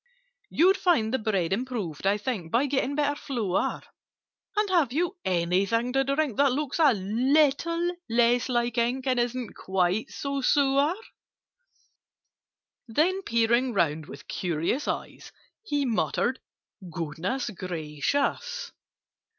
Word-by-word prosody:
"You'd 375 Hz, +5 st, +4 dB
find 250 Hz, -, +2 dB
the 260 Hz, -, +1 dB
bread 195 Hz, -5 st, 0 dB
improved, 205 Hz, -, -3 dB
I 200 Hz, +1 st, +3 dB
think, 205 Hz, -7 st, -4 dB
By 245 Hz, +5 st, +3 dB
getting 280 Hz, 0 st, 0 dB
better 290 Hz, -1 st, +1 dB
flour: 235 Hz, -10 st, -2 dB, 0.7 s
And 420 Hz, 0 st, +3 dB
have 330 Hz, -9 st, +3 dB
you 345 Hz, +7 st, 0 dB
anything 190 Hz, +7 st, +1 dB
to 270 Hz, 0 st, +3 dB
drink 275 Hz, -3 st, 0 dB
That 280 Hz, -2 st, +4 dB
looks 290 Hz, +2 st, -2 dB
a 305 Hz, -4 st, +6 dB
little 285 Hz, -, +1 dB
less 240 Hz, +2 st, +3 dB
like 240 Hz, -1 st, 0 dB
ink, 250 Hz, +3 st, 0 dB
And 255 Hz, -2 st, +1 dB
isn't 240 Hz, -1 st, -2 dB
quite 190 Hz, +5 st, 0 dB
so 280 Hz, -1 st, -3 dB
sour?" 280 Hz, +4 st, +3 dB, 1.9 s
Then, 335 Hz, -, +1 dB
peering 235 Hz, -2 st, +2 dB
round 160 Hz, -5 st, 0 dB
with -, -, -11 dB
curious 175 Hz, -, -1 dB
eyes, -, -, -5 dB, 0.3 s
He 290 Hz, -9 st, -1 dB
muttered 245 Hz, +1 st, 0 dB, 0.5 s
"Goodness 170 Hz, -, -3 dB
gracious!" 185 Hz, -, -2 dB
245 Hz, 120 wpm, -27 LUFS, 195-285 Hz, 1.9 s, a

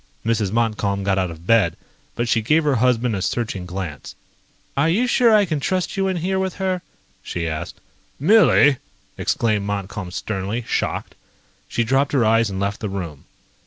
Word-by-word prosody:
Mrs. 110 Hz, -4 st, +1 dB
Montcalm 105 Hz, -3 st, 0 dB
got 95 Hz, 0 st, +1 dB
out 90 Hz, -1 st, 0 dB
of 85 Hz, 0 st, -11 dB
bed, 105 Hz, -6 st, +3 dB, 0.4 s
but 120 Hz, 0 st, -1 dB
she 115 Hz, 0 st, +2 dB
gave 155 Hz, +9 st, +3 dB
her 145 Hz, -4 st, +2 dB
husband 125 Hz, -1 st, +2 dB
a 95 Hz, -, -3 dB
searching 100 Hz, -4 st, -2 dB
glance. 90 Hz, -5 st, -6 dB, 0.6 s
"Are 145 Hz, +4 st, +2 dB
you 215 Hz, +9 st, +2 dB
sure 245 Hz, -1 st, +4 dB
I 210 Hz, -2 st, +5 dB
can 155 Hz, -5 st, -2 dB
trust 185 Hz, +5 st, -1 dB
you 195 Hz, -1 st, +1 dB
in 190 Hz, -1 st, -1 dB
here 190 Hz, +3 st, -1 dB
with 190 Hz, -1 st, -2 dB
her?" 185 Hz, -2 st, -1 dB, 0.4 s
she 85 Hz, -1 st, -4 dB
asked. 80 Hz, +2 st, -5 dB, 0.4 s
"Millie!" 150 Hz, -, +5 dB, 0.4 s
exclaimed 105 Hz, -3 st, 0 dB
Montcalm 100 Hz, -2 st, -4 dB
sternly, 100 Hz, +4 st, -3 dB
shocked. -, -, -2 dB, 0.5 s
She 120 Hz, -, 0 dB
dropped 135 Hz, +5 st, +1 dB
her 130 Hz, -5 st, +3 dB
eyes 115 Hz, 0 st, +3 dB
and 95 Hz, -1 st, -4 dB
left 100 Hz, +1 st, -2 dB
the 105 Hz, -, -3 dB
room. 85 Hz, -7 st, -6 dB
115 Hz, 175 wpm, -21 LUFS, 95-150 Hz, 0.6 s, I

